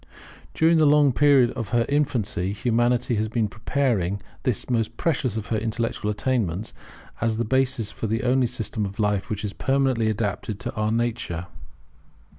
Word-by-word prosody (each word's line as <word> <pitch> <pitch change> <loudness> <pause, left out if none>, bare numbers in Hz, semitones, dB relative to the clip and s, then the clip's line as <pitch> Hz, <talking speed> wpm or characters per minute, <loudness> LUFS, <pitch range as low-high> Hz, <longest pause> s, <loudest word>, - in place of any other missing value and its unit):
During 160 0 +4
the 155 - +5
long 145 -2 +5
period 140 -3 +5
of 115 -5 -5
her 115 +1 +2
infancy 115 -10 0
Humanity 120 +2 +1
has 110 +1 0
been 110 0 0
preparing 110 -4 -1 0.2
this 125 -5 -1
the - - -6
most 115 0 -1
precious 135 -8 0
of 110 - -3
her 110 - +1
intellectual 115 -1 -2
attainments, 105 -3 -1 0.5
as 115 -1 +1
the 120 - 0
basis 130 -3 0
for 110 - -4
the 110 +1 -1
only 125 0 +3
system 115 -2 -3
of 100 0 -5
life 105 -2 0
which 105 0 -3
is 100 - -4
permanently 135 -5 +1
adapted 105 -1 -2
to 120 -1 -4
our 110 -1 -1
nature. 110 -7 -2
115 Hz, 170 wpm, -24 LUFS, 105-130 Hz, 0.5 s, the